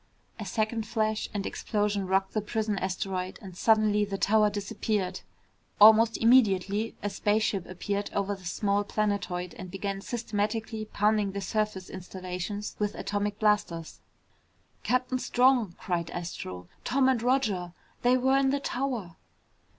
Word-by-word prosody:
A 210 Hz, -, -5 dB
second 220 Hz, +3 st, -1 dB
flash 215 Hz, -1 st, -1 dB
and 205 Hz, -2 st, -3 dB
explosion 205 Hz, -2 st, -1 dB
rocked 190 Hz, +1 st, +1 dB
the 215 Hz, -, 0 dB
prison 215 Hz, 0 st, -1 dB
asteroid 185 Hz, 0 st, -3 dB
and 190 Hz, -4 st, -10 dB
suddenly 215 Hz, 0 st, +3 dB
the 200 Hz, -1 st, -3 dB
tower 210 Hz, +3 st, +4 dB
disappeared. 200 Hz, -2 st, -2 dB, 0.6 s
Almost 220 Hz, +2 st, +7 dB
immediately, 215 Hz, -3 st, +3 dB
a 205 Hz, -, 0 dB
spaceship 205 Hz, -3 st, 0 dB
appeared 200 Hz, +3 st, -3 dB
over 200 Hz, 0 st, 0 dB
the 190 Hz, -2 st, -10 dB
small 200 Hz, +3 st, 0 dB
planetoid 200 Hz, -4 st, -2 dB
and 185 Hz, -, -7 dB
began 195 Hz, +1 st, -4 dB
systematically 220 Hz, 0 st, -2 dB
pounding 210 Hz, -1 st, +1 dB
the 200 Hz, -, -3 dB
surface 210 Hz, -3 st, -2 dB
installations 185 Hz, +2 st, -5 dB
with 210 Hz, -1 st, -1 dB
atomic 205 Hz, 0 st, -2 dB
blasters. 205 Hz, -6 st, 0 dB, 0.8 s
"Captain 255 Hz, +1 st, 0 dB
Strong," 245 Hz, -7 st, +3 dB
cried 170 Hz, -3 st, -2 dB
Astro. 95 Hz, -, -6 dB, 0.2 s
"Tom 265 Hz, +1 st, +2 dB
and 255 Hz, -3 st, +2 dB
Roger 220 Hz, -9 st, 0 dB, 0.3 s
they 250 Hz, +1 st, +4 dB
were 265 Hz, +2 st, +3 dB
in 270 Hz, -1 st, +3 dB
the 280 Hz, +1 st, +1 dB
tower!" 245 Hz, -11 st, -3 dB
205 Hz, 135 wpm, -28 LUFS, 190-220 Hz, 0.8 s, Almost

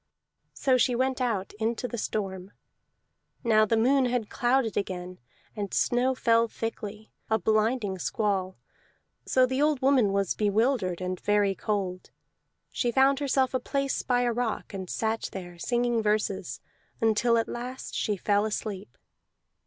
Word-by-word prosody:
So 260 Hz, -2 st, +3 dB
she 245 Hz, 0 st, +3 dB
went 260 Hz, +1 st, 0 dB
out 215 Hz, -6 st, -1 dB
into 230 Hz, +2 st, -1 dB
the 240 Hz, -2 st, -5 dB
storm. 195 Hz, -3 st, -4 dB, 0.9 s
Now 215 Hz, -2 st, +4 dB
the 225 Hz, -, +2 dB
moon 260 Hz, +4 st, +4 dB
had 245 Hz, -3 st, -1 dB
clouded 245 Hz, -2 st, +1 dB
again, 185 Hz, -2 st, -4 dB, 0.4 s
and 205 Hz, -3 st, -4 dB
snow 250 Hz, +2 st, +2 dB
fell 230 Hz, -1 st, +3 dB
thickly, 220 Hz, -1 st, -6 dB, 0.2 s
a 220 Hz, -, +3 dB
blinding 215 Hz, 0 st, +1 dB
squall; 190 Hz, -1 st, -1 dB, 0.7 s
so 255 Hz, -1 st, +4 dB
the 260 Hz, +2 st, -1 dB
old 300 Hz, -2 st, +2 dB
woman 260 Hz, -7 st, +4 dB
was 195 Hz, -2 st, +1 dB
bewildered, 210 Hz, -3 st, +1 dB
and 185 Hz, 0 st, -3 dB
very 205 Hz, -1 st, +2 dB
cold. 190 Hz, -3 st, -3 dB, 0.6 s
She 240 Hz, -, 0 dB
found 270 Hz, +2 st, +4 dB
herself 270 Hz, -2 st, +1 dB
a 255 Hz, -, +1 dB
place 275 Hz, +2 st, -1 dB
by 245 Hz, -1 st, +1 dB
a 240 Hz, -1 st, +1 dB
rock, 230 Hz, -3 st, -3 dB
and 190 Hz, -2 st, -6 dB
sat 225 Hz, 0 st, -1 dB
there, 175 Hz, -2 st, -8 dB
singing 240 Hz, +2 st, +1 dB
verses, 210 Hz, -, -1 dB, 0.4 s
until 225 Hz, +1 st, +3 dB
at 225 Hz, -, 0 dB
last 250 Hz, +2 st, -6 dB
she 210 Hz, -3 st, -1 dB
fell 205 Hz, +2 st, +2 dB
asleep. 200 Hz, -, -5 dB
220 Hz, 145 wpm, -27 LUFS, 200-250 Hz, 0.9 s, Now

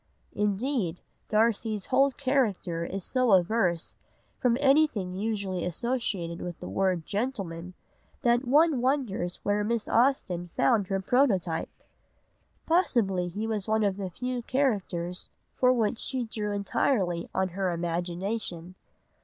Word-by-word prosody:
'" -, -, -40 dB
Indeed, 210 Hz, -, -1 dB, 0.3 s
Darcy's 215 Hz, -1 st, +1 dB
whole 270 Hz, +2 st, +4 dB
character 245 Hz, -11 st, 0 dB
is 190 Hz, +2 st, -4 dB
so 255 Hz, -1 st, +2 dB
averse 180 Hz, -2 st, +2 dB, 0.4 s
from 240 Hz, -1 st, +2 dB
anything 270 Hz, -10 st, +3 dB
usually 195 Hz, -2 st, -2 dB
associated 180 Hz, -3 st, -1 dB
with 175 Hz, -2 st, -6 dB
the -, -, -7 dB
word 175 Hz, -, 0 dB
gentleman, 190 Hz, -6 st, -3 dB, 0.5 s
that 240 Hz, +1 st, +2 dB
one 295 Hz, 0 st, +4 dB
wonders 245 Hz, -10 st, -1 dB
where 205 Hz, +1 st, +1 dB
Miss 230 Hz, +1 st, -1 dB
Austen 205 Hz, -9 st, +1 dB
found 195 Hz, +8 st, +3 dB
her 195 Hz, 0 st, -1 dB
prototype. 190 Hz, -, +1 dB, 1.0 s
Possibly 225 Hz, -, +2 dB
he 205 Hz, +5 st, -4 dB
was 215 Hz, -3 st, -1 dB
one 220 Hz, 0 st, +2 dB
of 200 Hz, -2 st, +1 dB
the 195 Hz, -2 st, -4 dB
few 250 Hz, +6 st, -4 dB
characters 200 Hz, -10 st, -1 dB, 0.2 s
for 250 Hz, -1 st, +3 dB
which 230 Hz, -2 st, +1 dB
she 260 Hz, -2 st, -1 dB
drew 215 Hz, -2 st, -3 dB
entirely 200 Hz, -3 st, 0 dB
on 190 Hz, 0 st, 0 dB
her 190 Hz, +1 st, -1 dB
imagination. 175 Hz, +2 st, -3 dB
205 Hz, 130 wpm, -28 LUFS, 180-245 Hz, 1.0 s, whole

